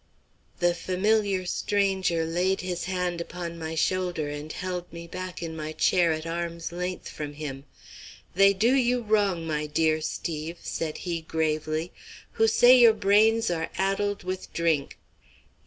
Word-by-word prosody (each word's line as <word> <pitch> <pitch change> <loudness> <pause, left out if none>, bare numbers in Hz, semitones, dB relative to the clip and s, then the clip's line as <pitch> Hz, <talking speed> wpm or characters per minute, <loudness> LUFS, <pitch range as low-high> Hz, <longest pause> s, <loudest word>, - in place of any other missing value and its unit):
The 175 -1 +2
familiar 190 +2 0
stranger 190 -4 0
laid 180 +4 0
his 180 -1 -3
hand 180 -2 -2
upon 170 -1 -6
my 160 0 -4
shoulder 175 -3 0
and 145 +1 -6
held 180 0 -5
me 170 0 -8
back 185 +1 -6
in 165 -1 -5
my 155 0 -5
chair 175 0 +3
at 155 0 -3
arm's 170 0 -4
length 180 +1 -4
from 150 -1 -6
him. 145 -2 -6 0.7
"They 195 +2 +6
do 220 +6 +3
you 250 -2 +2
wrong, 205 -6 +1
my 150 -1 -2
dear 155 +1 +1
Steve," 160 +1 -4
said 155 -2 -3
he, 170 -2 -2
gravely, 155 +1 -1 0.4
"who 225 - +2
say 245 +3 +7
your 235 -2 +8
brains 215 +1 +3
are 165 -1 -2
addled 195 +1 0
with 185 +1 -5
drink. 165 -4 0
175 Hz, 150 wpm, -26 LUFS, 160-195 Hz, 0.7 s, your